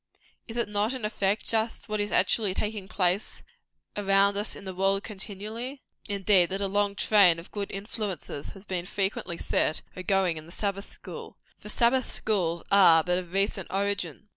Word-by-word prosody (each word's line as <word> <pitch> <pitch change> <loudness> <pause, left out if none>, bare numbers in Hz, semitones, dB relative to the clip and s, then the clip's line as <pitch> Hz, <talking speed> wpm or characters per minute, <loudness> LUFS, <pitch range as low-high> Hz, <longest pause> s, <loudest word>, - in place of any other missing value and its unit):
Is 230 - -7
it 235 - +1
not, 210 +3 0
in 255 -5 -4
effect, 205 -1 0
just 225 +1 -1
what 215 -1 -2
is 205 0 -1
actually 205 -5 +3
taking 210 -2 -3
place 185 +1 0 0.5
around 200 0 +3
us 205 +1 0
in - - -10
the 190 - -5
world 195 +2 +1
continually? 215 +6 -6 0.3
Not, 200 - -1
indeed, 195 -3 +4
that 195 +1 -2
a 200 - 0
long 200 +1 0
train 195 -5 +5
of 165 - -11
good 205 -1 -4
influences 195 -7 -4
has 195 0 -12
been 180 -2 -3
frequently 190 -3 -2
set 155 - 0
agoing 185 -2 +1
in 155 +1 -9
the - - -12
Sabbath 200 +1 -3
school - - -10 0.2
for 210 - -9
Sabbath 240 +4 +2
schools 170 -6 0
are 170 -5 +7
but 180 +1 +1
of 175 -2 -9
recent 195 0 0
origin. 200 -1 -2
200 Hz, 180 wpm, -27 LUFS, 185-210 Hz, 0.5 s, are